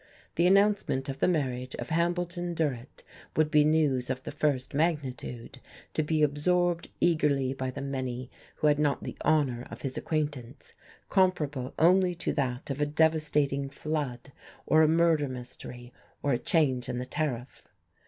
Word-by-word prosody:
The 170 +2 +3
announcement 195 -9 +3
of 135 0 -5
the - - +3
marriage 130 -7 -1
of - - -6
Hambleton 175 +1 -1
Durrett 140 -6 -3 0.3
would 155 -1 +2
be 150 -1 +6
news 145 -5 +2
of 130 0 -3
the - - -5
first 135 -4 -1
magnitude, 140 -6 -2 0.3
to - - +1
be 155 0 +1
absorbed 175 +4 +1
eagerly 145 -6 +2
by 130 -1 -3
the 130 - -6
many 130 -2 -4 0.2
who - - -3
had 150 -1 +4
not 145 -2 +1
the - - -6
honour 140 -6 +1
of - - -10
his 135 -2 -3
acquaintance, 145 -4 -3 0.4
comparable 150 -9 +1
only 180 +2 +4
to 170 - -2
that 130 -1 -2
of 135 +2 -3
a 145 - +2
devastating 150 -3 +1
flood 140 -3 -4 0.3
or 155 - +5
a 155 - +6
murder 160 -2 +3
mystery 125 -1 -9 0.3
or 145 - +1
a 120 - 0
change 130 -7 +1
in 125 - -2
the 125 - -3
tariff. 130 -4 -4
145 Hz, 160 wpm, -29 LUFS, 130-160 Hz, 0.4 s, be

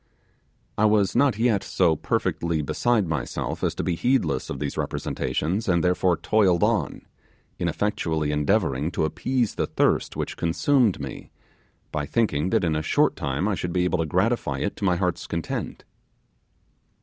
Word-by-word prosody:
I 110 - +4
was 105 -3 +3
not 130 -2 +3
yet 115 -4 +2
so 85 -4 +2
perfectly 80 +1 -1
beside 110 - +1
myself 75 -7 -3
as - - 0
to - - -3
be 90 - 0
heedless 85 - 0
of - - -4
these 70 -1 -3
representations, 95 +8 -2
and 85 -2 +2
therefore 90 0 +2
toiled 95 -6 +2
on, - - 0 0.6
ineffectually 80 -4 -1
endeavouring 75 -2 +1
to 80 - +1
appease 120 - -1
the - - -1
thirst - - +1
which - - -4
consumed 110 - +2
me, 70 -2 -7 0.6
by 75 -2 -2
thinking 95 -8 +1
that - - +2
in 80 -3 +1
a 75 - 0
short - - +2
time 70 +7 -2
I 105 - +1
should 90 -2 -3
be 90 - +2
able 90 0 0
to 80 - 0
gratify 105 +10 0
it 100 - -2
to - - -7
my 90 -2 +3
heart's 90 -1 -2
content. - - -4
90 Hz, 160 wpm, -24 LUFS, 80-105 Hz, 0.6 s, I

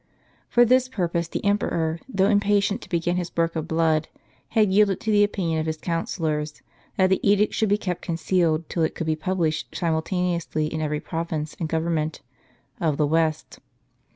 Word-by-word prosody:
For 240 0 +5
this 255 +2 +3
purpose 170 -7 -1
the 170 - -5
emperor, 170 -5 0
though 195 -6 +2
impatient 205 0 +2
to - - -12
begin 175 +1 0
his 175 -1 -3
work 165 0 +1
of 160 0 -3
blood, 160 -1 +1 0.4
had 215 -4 +2
yielded 200 -2 +4
to 220 - -1
the 205 -1 +5
opinion 175 -6 0
of 155 - -2
his 160 0 -2
counsel 165 +1 -3
lors, 150 -1 -2 0.3
that 185 0 +3
the 190 - +3
edict 205 +1 +3
should 220 - +1
be 205 - +3
kept 180 -4 -3
concealed 165 -2 0
till 170 - -2
it 160 - 0
could 165 - -3
be 155 0 +1
published 160 -1 -1
siumltaneously 170 -1 -1
in 160 - -2
every 150 -1 -1
province, 160 -2 -4
and 160 - -2
government, 160 -1 -1 0.6
of 155 -4 0
the 150 - +3
West. 155 0 0
170 Hz, 180 wpm, -24 LUFS, 160-195 Hz, 0.6 s, For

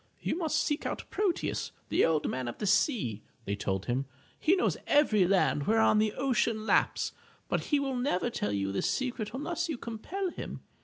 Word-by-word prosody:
"You - - -1
must 325 -3 0
seek 295 - 0
out - - -3
Proteus, 400 -4 -1 0.2
the - - +3
Old 160 -2 +2
Man 130 -1 -2
of 120 - -5
the - - -3
Sea/' 185 - +2 0.2
they 100 - -1
told 95 -1 -2
him. 130 +2 -1 0.3
"He 350 - +4
knows 385 - +1
every 215 - +4
land 180 -6 +2
whereon 220 -1 +4
the 215 -1 +2
ocean 230 -4 0
laps, - - +2 0.4
but - - -1
he 295 - +2
will 270 -2 -1
never 245 -3 0
tell 105 - -2
you 100 -1 -1
this 100 - 0
secret 245 -5 -2
unless 335 +7 -2
you 305 - -2
compel 340 - -4
him. - - -7
225 Hz, 190 wpm, -30 LUFS, -, 0.4 s, He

